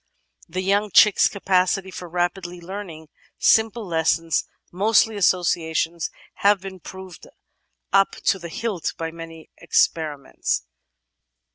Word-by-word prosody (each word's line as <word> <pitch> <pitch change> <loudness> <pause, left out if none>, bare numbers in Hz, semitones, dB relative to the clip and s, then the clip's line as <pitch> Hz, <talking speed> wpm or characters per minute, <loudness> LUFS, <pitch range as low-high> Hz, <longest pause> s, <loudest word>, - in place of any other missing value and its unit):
The 185 +1 -3
young 200 +2 +1
chick's 210 +2 +6
capacity 190 -1 0
for 180 -1 -8
rapidly 175 +1 -2
learning 170 -4 -8 0.3
simple 220 0 +3
lessons, 165 -1 +1 0.3
mostly 215 +3 +3
associations, 170 -3 +1 0.3
has 205 +1 +5
been 190 0 -9
proved 185 0 -11 0.7
up 195 0 +4
to 195 - +2
the 170 -1 -8
hilt 200 0 -3
by 165 0 -4
many 165 -1 -11
experiments. 150 - 0
180 Hz, 110 wpm, -23 LUFS, 165-195 Hz, 0.7 s, chick's